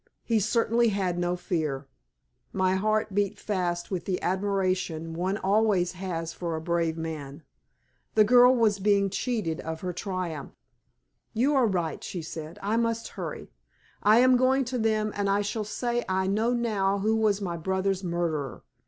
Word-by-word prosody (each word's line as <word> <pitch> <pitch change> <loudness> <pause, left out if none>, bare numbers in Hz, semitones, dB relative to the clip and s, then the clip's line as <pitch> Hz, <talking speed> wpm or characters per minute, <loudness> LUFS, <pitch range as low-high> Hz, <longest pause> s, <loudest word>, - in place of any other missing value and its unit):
He 230 -2 +2
certainly 230 +2 +2
had 190 -4 -1
no 175 0 0
fear. 155 -6 -2 0.7
My 185 -1 +1
heart 215 +2 0
beat 205 +1 0
fast 180 -4 -2
with 185 -3 -3
the 185 -2 -1
admiration 185 -4 -1
one 185 +4 -1
has - - -6
always 195 -3 +2 0.4
for 170 -2 -3
a - - -2
brave 165 0 -1
man. 155 -2 -6 0.7
The 215 - +7
girl 245 +3 +6
was 215 -4 +2
being 200 -1 +2
cheated 200 -6 -2
of 160 0 -5
her 180 -1 -3
triumph. 180 -6 -4 0.8
"You 260 +6 +2
are 260 -4 +4
right," 175 -6 -2
she 175 -3 -5
said, 160 0 -7
"I 210 +3 +1
must 230 0 -1
hurry; 170 -6 -7 0.5
I 210 +2 +5
am 255 0 +6
going 260 +1 +3
to 250 - 0
them 215 -1 +1
and 200 -1 0
I 200 +1 +2
shall 210 +2 -2
say 240 +3 -2
I 190 0 +1
know 215 +5 +1
now 210 -5 +1
who 215 +3 +1
was 215 -2 +2
my 180 -4 -3
brother's 190 +3 -1
murderer! 170 -6 -2
195 Hz, 165 wpm, -27 LUFS, 175-220 Hz, 0.8 s, The